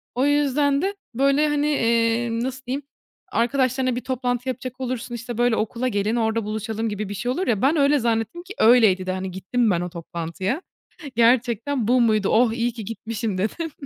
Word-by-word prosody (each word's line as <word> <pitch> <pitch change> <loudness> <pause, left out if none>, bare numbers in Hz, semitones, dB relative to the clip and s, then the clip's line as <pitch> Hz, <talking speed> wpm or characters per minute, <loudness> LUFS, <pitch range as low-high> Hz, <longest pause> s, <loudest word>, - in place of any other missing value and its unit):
O 260 +3 +2
yüzden 290 0 +2
de 395 +2 -1 0.2
böyle, 275 +4 +3
hani, 295 0 +1
eee, 230 -3 +2
nasıl 255 +3 -3
diyeyim? 270 +3 -3 0.5
Arkadaşlarına 255 +1 +1
bir 250 - -3
toplantı 250 -1 -2
yapacak 255 +1 -6
olursun, 245 -1 -3
işte, 235 0 -6
böyle, 240 -1 +3
"Okula 235 +4 -1
gelin, 210 0 0
orada 225 -1 0
buluşalım." 220 +1 -3
gibi 205 -1 -4
bir - - -4
şey 245 +5 -2
olur 365 +8 -2
ya. 215 -4 +1
Ben 280 +5 +3
öyle 285 0 +4
zannettim 230 +8 -1
ki 385 +2 -9
öyleydi 220 -6 +5
de, - - 0
hani, 185 0 -4
gittim 215 +5 0
ben 175 -1 +1
o 180 - -3
toplantıya. 170 - -4 0.5
"Gerçekten 235 +1 +2
bu 250 0 +4
muydu? 215 -3 +2
Oh! 225 0 +3
İyi 235 +1 0
ki 225 -4 -7
gitmişim." 225 -2 -4
dedim. 305 - -2
235 Hz, 185 wpm, -23 LUFS, 220-260 Hz, 0.5 s, öyleydi